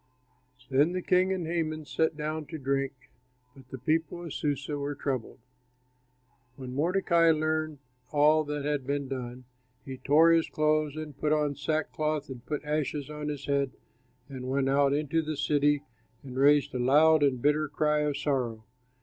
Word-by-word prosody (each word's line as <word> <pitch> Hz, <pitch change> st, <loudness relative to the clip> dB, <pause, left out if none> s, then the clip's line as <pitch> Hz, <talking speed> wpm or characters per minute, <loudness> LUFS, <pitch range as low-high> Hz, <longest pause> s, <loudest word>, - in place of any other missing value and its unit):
Then 145 Hz, +6 st, +3 dB
the 185 Hz, -1 st, -3 dB
king 185 Hz, +1 st, +3 dB
and 185 Hz, -3 st, -2 dB
Haman 160 Hz, -2 st, -2 dB
sat 160 Hz, +1 st, 0 dB
down 155 Hz, 0 st, -3 dB
to 160 Hz, -, -6 dB
drink, 135 Hz, -1 st, -3 dB, 0.4 s
but 130 Hz, -2 st, -17 dB
the 130 Hz, -, -7 dB
people 160 Hz, +6 st, -1 dB
of 165 Hz, -, -6 dB
Susa 145 Hz, 0 st, -2 dB
were 145 Hz, 0 st, -3 dB
troubled. 135 Hz, -4 st, -3 dB, 1.2 s
When 130 Hz, -2 st, -8 dB
Mordecai 170 Hz, +2 st, +2 dB
learned 155 Hz, -1 st, 0 dB, 0.3 s
all 155 Hz, +1 st, +4 dB
that 145 Hz, -1 st, -4 dB
had 145 Hz, -3 st, -1 dB
been 140 Hz, -1 st, -1 dB
done, 125 Hz, -1 st, -6 dB, 0.4 s
he 130 Hz, -1 st, -7 dB
tore 160 Hz, +4 st, +5 dB
his 165 Hz, -1 st, +3 dB
clothes 155 Hz, -1 st, +1 dB
and 155 Hz, -2 st, -7 dB
put 150 Hz, -, 0 dB
on 150 Hz, -2 st, +2 dB
sackcloth 155 Hz, 0 st, -2 dB
and 125 Hz, -3 st, -8 dB
put 150 Hz, 0 st, -3 dB
ashes 150 Hz, -1 st, -2 dB
on 150 Hz, 0 st, -5 dB
his 145 Hz, -2 st, -4 dB
head, 140 Hz, -2 st, 0 dB, 0.5 s
and 130 Hz, -2 st, -7 dB
went 135 Hz, 0 st, +1 dB
out 140 Hz, 0 st, +3 dB
into 150 Hz, +3 st, 0 dB
the 155 Hz, -1 st, -4 dB
city 145 Hz, 0 st, +2 dB, 0.4 s
and 130 Hz, -2 st, -9 dB
raised 145 Hz, +1 st, +4 dB
a 125 Hz, -, -2 dB
loud 150 Hz, +5 st, +5 dB
and 135 Hz, -3 st, +2 dB
bitter 150 Hz, +3 st, +2 dB
cry 150 Hz, +1 st, +1 dB
of 150 Hz, -1 st, 0 dB
sorrow. 125 Hz, -7 st, -2 dB
150 Hz, 165 wpm, -28 LUFS, 140-155 Hz, 1.2 s, tore